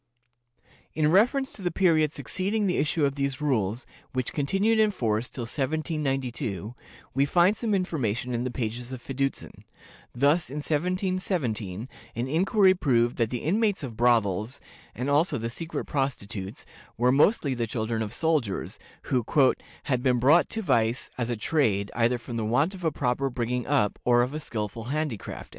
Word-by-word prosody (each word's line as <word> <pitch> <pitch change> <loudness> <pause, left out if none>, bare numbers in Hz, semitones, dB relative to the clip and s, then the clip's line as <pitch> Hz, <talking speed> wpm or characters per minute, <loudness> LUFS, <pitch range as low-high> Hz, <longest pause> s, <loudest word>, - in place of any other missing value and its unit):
In 155 -1 +2
reference 250 +8 +3
to - - -10
the 180 - 0
period 160 -4 +3
succeeding 195 +9 -2
the 180 - +1
issue 150 0 +1
of 140 - 0
these 140 -2 -2
rules, 120 -6 0 0.3
which 130 -2 -2
continued 195 +10 +1
in 215 -1 +5
force 115 - -1
till 125 - -6
1792, 135 - -2 0.4
we 135 - +3
find 175 +7 +4
some 220 -3 0
information 125 - -1
in 120 0 -1
the 130 - -1
pages 120 0 -4
of 130 - -5
Fiducin. 135 +2 -4 0.5
Thus, 145 +7 +2
in 140 - -7
1717, 150 - -1 0.3
an 120 +3 -2
inquiry 190 - +4
proved 120 -9 +1
that 115 -3 +1
the 125 -1 -4
inmates 205 +2 +1
of 120 -5 -6
brothels, 115 0 +2 0.4
and 125 +3 -3
also 145 +5 +2
the 115 +1 -3
secret 165 +6 -4
prostitutes, 110 -8 -3 0.3
were 125 +2 +3
mostly 145 - +3
the 120 -2 -2
children 110 0 -2
of 105 -2 -3
soldiers, 145 - -1 0.2
who 125 -2 0 0.6
"had 130 -3 0
been 125 -1 +2
brought 145 +8 +5
to 225 - -4
vice 115 - +1
as 120 -1 -2
a 120 - -1
trade, 105 -7 +1
either 120 +2 +2
from 120 0 -6
the 115 - -1
want 140 - +2
of 185 -2 -10
a 160 - +2
proper 135 -1 0
bringing 125 0 -2
up 135 -8 +1
or 120 0 +4
of 125 +3 -3
a 155 - -3
skillful 115 -5 -5
handicraft."... 140 -5 -4
135 Hz, 165 wpm, -27 LUFS, 120-160 Hz, 0.6 s, in